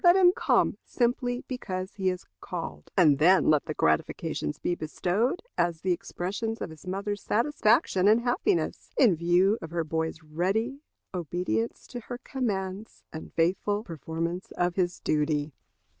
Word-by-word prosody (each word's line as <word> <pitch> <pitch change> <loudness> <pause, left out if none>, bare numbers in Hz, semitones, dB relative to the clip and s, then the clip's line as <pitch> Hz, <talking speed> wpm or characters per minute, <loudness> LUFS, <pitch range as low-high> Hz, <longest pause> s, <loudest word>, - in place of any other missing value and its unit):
Let 350 0 +7
him 365 -2 +7
come - - +2
simply 245 0 0
because 190 -7 -4
he 190 -2 0
is 180 -1 -4
called; 75 0 -6
and 150 -6 +5
then 180 +1 +5
let 150 -2 +3
the 155 - -4
gratifications 80 -1 0
be - - -1
bestowed 185 - -1 0.2
as 170 -2 +1
the 185 - +1
expressions 200 +6 -3
of - - -5
his 160 +3 -13
mother's 200 +2 -3
satisfaction 230 - +2
and 220 +3 +5
happiness, 255 - -1
in 230 -10 +6
view 175 +6 +3
of 165 - -6
her 170 0 -1
boy's 160 +1 -3
ready 195 - -1 0.3
obedience 170 -10 -2
to 245 - -7
her 240 +1 -7
commands 210 -6 -4
and 160 - -7
faithful 195 +5 +1
performance 165 - -4
of 175 0 +1
his 175 -1 0
duty. 150 -1 0
185 Hz, 150 wpm, -28 LUFS, 165-225 Hz, 0.3 s, Let